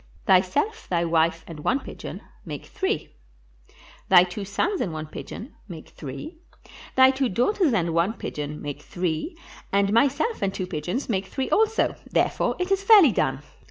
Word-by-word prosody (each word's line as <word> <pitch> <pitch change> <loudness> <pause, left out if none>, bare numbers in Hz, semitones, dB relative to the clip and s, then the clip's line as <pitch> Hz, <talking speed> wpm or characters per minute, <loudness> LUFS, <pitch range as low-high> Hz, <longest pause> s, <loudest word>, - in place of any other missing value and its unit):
Thyself, 190 - +2
thy 170 -1 +1
wife, 165 0 +1
and 165 -3 -9
one 265 - +1
pigeon - - -8 0.2
make - - -7
three; 380 - -3 1.0
thy 180 -2 +8
two 185 +3 -5
sons 335 - -1
and 180 - -1
one 155 0 -5
pigeon 215 - -8
make 165 -5 -10
three; 305 - -8 0.6
thy 260 0 +7
two 265 -1 0
daugh 245 - +1
ters 365 -9 +2
and 170 -7 0
one 170 +6 +2
pigeon 150 -8 -5
make 145 0 -5
three, 175 - -3 0.3
and 200 +1 +2
myself 280 - +2
and 195 - +1
two 185 - -2
pigeons 180 - -3
make 195 -4 -1
three 260 +7 -3
also; 445 +1 +2 0.2
therefore - - +1
is 360 +1 -2
it 390 - +3
fairly 395 - +7
done. 135 -6 -1
195 Hz, 165 wpm, -25 LUFS, -, 1.0 s, thy